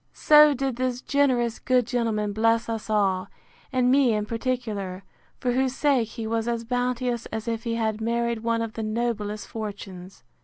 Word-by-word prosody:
So 300 -1 +6
did 265 -2 -2
this 255 -1 -1
generous 255 -5 +1
good 255 -2 +2
gentleman 220 -4 -1
bless 225 +2 +2
us 225 -1 -4
all, 195 -3 +1 0.4
and 255 -1 +2
me 265 -3 +4
in 210 -1 -1
particular; 220 -5 -3 0.4
for 250 - 0
whose 260 +1 0
sake 270 -6 +2
he 225 -1 -6
was 225 +1 -1
as 235 -1 -1
bounteous 245 0 -1
as 220 +1 -5
if 230 +1 -3
he 230 -1 -1
had 220 -1 -1
married 235 0 0
one 230 0 0
of 225 -1 -5
the 225 - -5
noblest 215 -1 -2
fortunes. 195 -4 -8
230 Hz, 175 wpm, -25 LUFS, 215-250 Hz, 0.4 s, So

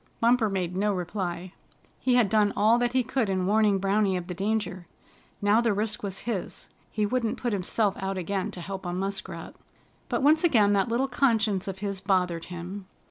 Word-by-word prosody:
Bumper 235 -1 +3
made 180 -2 -2
no 205 +2 +1
reply. 180 -1 -4 0.5
He 255 -1 +2
had 240 -4 +4
done 210 0 +2
all 220 +3 +4
that 245 0 0
he 255 -1 +3
could 240 -3 -1
in 185 -1 0
warning 210 0 +3
Browny 195 0 +1
of 180 - -5
the 180 - -5
danger. 190 -2 -2 0.6
Now 205 +3 +4
the 230 -3 +2
risk 215 +1 -1
was 195 -2 -5
his. 220 -7 -4 0.2
He 210 -1 -1
wouldn't 230 0 -1
put 240 -3 -2
himself 200 +2 0
out 195 0 -3
again 190 +1 -2
to 180 - -7
help 190 +2 -6
a 175 - -3
Muskrat. 190 -2 -4 0.6
But - - -1
once 310 +3 +4
again 215 -11 +4
that 200 +3 +2
little 245 +4 +1
conscience 225 -7 +1
of 195 -1 -4
his 200 -2 -3
bothered 180 -4 0
him. 180 +2 -7
200 Hz, 190 wpm, -27 LUFS, 185-225 Hz, 0.6 s, had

